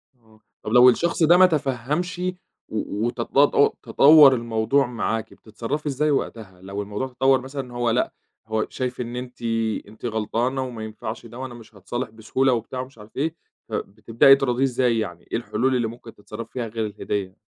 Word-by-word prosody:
آه، 110 -3 -25 0.2
طَب 105 - -4
لو 125 +2 +8
الشخص 170 +7 +1
ده 170 +3 +6
ما 185 - +8
تفهّمش 150 +2 -1 0.5
و 110 0 -3
وتط 120 -1 -4 0.5
تطوّر 145 -1 +7
الموضوع 115 +3 +1
معاكِ 115 -2 -3
بتتصرّفي 115 +8 -5
إزاي 150 +2 +1
وقتها 105 -9 -3
لو 100 +2 -5
الموضوع 105 +6 -4
تطوّر، 130 +1 +2
مثلًا 130 -1 -7
هو 120 -1 0
لأ، 115 - 0 0.3
هو 110 0 0
شايف 125 -1 -4
إن 120 0 -5
أنتِ 125 0 -7 0.5
أنتِ 110 +3 -11
غلطانة 115 +4 -1
وما 120 -4 -6
ينفعش 110 +1 -7
ده، 120 +2 -10
وأنا 130 -2 -6
مش 115 -2 -14
هاتصالح 120 +6 -4
بسهولة 115 +4 0
وبتاع 120 +2 -3
ومش 130 0 -7
عارف 105 0 -15
إيه، 160 +4 -1 0.3
فبتبدئي 115 +6 +3
تراضيه 135 -2 0
إزاي؟ 125 -3 +2
يعني 90 -5 -5
إيه - - +1
الحلول 120 +2 0
اللي 120 -3 +1
ممكن 115 0 -10
تتصرّفي 115 +2 -9
فيها 120 -3 -3
غير 110 0 -3
الهدية؟ 100 -2 -4
120 Hz, 170 wpm, -23 LUFS, 110-130 Hz, 0.5 s, لو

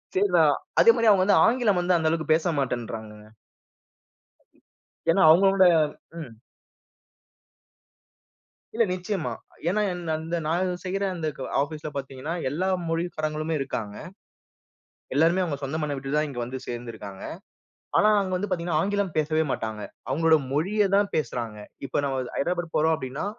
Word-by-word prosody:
சரி 405 +1 +3
நான் - - +5 0.2
அதே 465 - +8
மாரி 230 -1 +3
அவங்க 190 -2 +4
வந்து 195 -5 +5
ஆங்கிலம் 225 -6 +2
வந்து 180 0 +2
அந்த 160 -1 0
அளவுக்கு 160 -1 +1
பேச 160 +2 +1
மாட்டேன்றாங்க. 115 -4 -3 2.0
ஏன்னா 190 +3 +3
அவங்களோட 195 +3 +5 0.6
ம். 125 -7 -10 2.4
இல்ல 230 - +4
நிச்சயமா. 185 -1 -3 0.4
ஏன்னா 210 +4 +1
என்ன 170 -3 -3
அந்த 165 +2 -4
நான் 175 +4 0
செய்ற 195 +1 -3
அந்த 160 -2 -3 0.3
ஆபிஸ்ல 155 +1 -4
பாத்தீங்கன்னா, 135 +3 -5 0.2
எல்லா 175 +7 -1 0.2
மொழிக்காரங்களுமே 160 -2 -2
இருக்காங்க. 110 -6 -4 1.2
எல்லாருமே 165 +6 +3
அவங்க 150 -5 -2
சொந்த 140 +3 -3
மண்ண 150 -1 -2
விட்டுதான் 145 +3 -1
இங்க 135 -4 -7
வந்து 130 +2 -6
சேர்ந்து 120 -1 -5
இருக்காங்க. 100 -3 -9 0.8
ஆனா 210 - +5
அங்க 190 -1 -3
வந்து 200 +2 -2
பாத்தீங்கன்னா, 170 -3 0
ஆங்கிலம் 200 -3 -1
பேசவே 155 +1 +2
மாட்டாங்க. 110 -1 -3 0.3
அவங்களோட 160 0 +4 0.2
மொழிய 195 +7 +2
தான் 200 0 +2
பேசறாங்க. 120 -6 -3 0.3
இப்ப 140 - -1
நம்ம 135 -2 -1
ஹைட்ரபாட் 175 +2 -2
போறோம் 160 +1 +3
அப்டின்னா, 130 +1 -5
160 Hz, 135 wpm, -25 LUFS, 135-185 Hz, 2.4 s, அதே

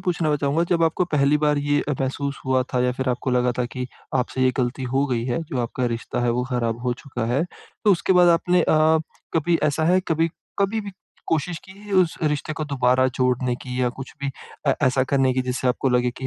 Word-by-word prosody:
पूछना 170 -4 0
चाहूँगा 145 +3 +1
जब 170 -1 +3
आपको 165 +3 +1
पहली 150 -3 +2
बार 150 -1 +2
ये 145 0 +1
अ, 145 - +1
महसूस 140 +1 -2
हुआ 130 -1 +3
था 125 - +3
या 125 - +1
फिर 130 +1 -3
आपको 125 +1 -1
लगा 125 0 +2
था 125 - +2
कि 125 +1 -5 0.3
आपसे 130 0 0
ये 130 - +5
गलती 125 +1 -1
हो 135 +1 +3
गई 120 -3 -1
है, 125 +6 -1
जो 145 -4 -5
आपका 125 +2 -2
रिश्ता 115 +1 -3
है 120 - +2
वो 125 +1 0
खराब 115 -2 -1
हो 125 -1 0
चुका 125 -4 -4
है 135 +8 +1 0.4
तो 205 - +6
उसके 185 +1 +1
बाद 180 -1 +6
आपने 175 +1 +3
अ, 160 0 +4 0.4
कभी 165 +1 +2
ऐसा 150 +1 +1
है 180 +3 +4
कभी 165 +1 +2 0.3
कभी 200 +3 +1
भी 205 -1 -7 0.4
कोशिश 165 +2 -1
की 190 - -13
है 205 -1 -9
उस 185 -3 +3
रिश्ते 150 0 0
को 155 - -1
दोबारा 130 -2 +2
जोड़ने 125 -1 +1
की 125 0 -4
या 125 - +2
कुछ 135 - -7
भी 140 - -2 0.4
ऐ 135 - +6
ऐसा 130 0 +2
करने 135 -1 +2
की 130 - +1
जिससे 125 0 -1
आपको 130 +2 +1
लगे 125 0 +2
कि 130 - -4
140 Hz, 230 wpm, -23 LUFS, 125-160 Hz, 0.4 s, तो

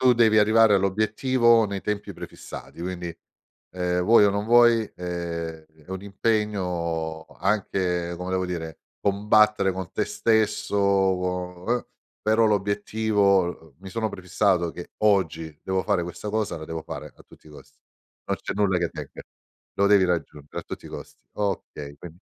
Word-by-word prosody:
Tu 130 -1 +6
devi 115 -2 +4
arrivare 110 0 +5
all'obiettivo 110 +4 +3
nei 100 -1 -3
tempi 105 0 -3
prefissati, 85 - -9
quindi, 90 -2 -5 0.5
ehm, 90 -1 -1
vuoi 105 +2 +6
o - - +3
non 100 +1 -1
vuoi 120 0 +6
è 85 -2 -5 0.2
è - - -27
un 95 0 -5
impegno 90 -7 -1 0.2
anche, 90 -3 0
come 90 +1 -5
devo 95 0 0
dire, 80 -3 -5 0.2
combattere 105 0 +3
con 95 -1 -6
te - - 0
stesso 110 -2 +1
uo 90 -2 +1
uhm. 120 +1 0 0.4
Però 110 +1 +4
l'obiettivo, 100 -5 +1
mi 95 +1 -10
sono 110 +2 -2
prefissato 90 -2 0
che 90 - -9
oggi 80 -7 +1
devo 95 0 -1
fare 100 -4 +1
questa 90 +4 -6
cosa, 110 -3 -1
la 80 - -7
devo 80 0 -5
fare - - -8
a - - -17
tutti - - -20
i - - -14
costi. 75 - -16 0.5
Non - - -1
c'è - - -3
nulla 100 -3 +2
che 85 -1 0
tenga, - - -8 0.5
lo 100 - +2
devi 100 -2 +5
raggiungere 75 -5 -3
a - - -15
tutti - - -8
i - - -9
costi. - - -10
Okay, 90 -8 -4
quind 85 +1 -11
95 Hz, 160 wpm, -25 LUFS, 90-105 Hz, 0.5 s, Tu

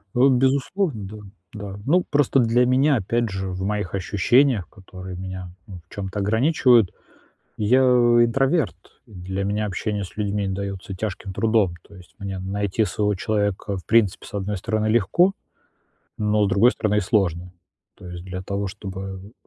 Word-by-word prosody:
Э, - - 0
безусловно, 135 - +1
да, 105 +3 -9 0.4
да. 100 -2 -7
Ну 175 +6 +3
просто 140 -2 +3
для 120 +1 +3
меня 135 +3 +3
опять 115 +3 -1
же 95 0 -4
в 95 0 -5
моих 100 -1 -2
ощущениях, 105 +3 +2
которые 95 -2 -10
меня, 95 -1 -7 0.2
ну, 95 -3 -9
в - - -17
чём-то 100 0 -4
ограничивают, 115 - +3 0.7
я 115 +5 +3
интроверт, 120 - +3 0.3
для 95 -2 -5
меня 105 +2 -1
общение 105 +1 -3
с 90 - -12
людьми 105 -1 -1
даётся 100 0 -5
тяжким 95 0 -5
трудом. 110 -3 +1
То 100 - -18
есть 90 -1 -16
мне 100 -1 -5
найти 100 +3 -1
своего 105 +2 0
человека, 105 0 -1
в 90 - -12
принципе, 115 -5 +2
с - - -13
одной 100 +1 -2
стороны, 110 +2 -1
легко, 120 - +3 0.8
но 105 0 +1
с - - +1
другой 100 +6 +5
стороны, 105 -4 -1
и - - +3
сложно. 90 -3 0 0.4
То 90 - -11
есть 90 0 -8
для 95 0 -6
того, 100 +1 -3
чтобы 95 0 -8
105 Hz, 160 wpm, -23 LUFS, 95-115 Hz, 0.8 s, другой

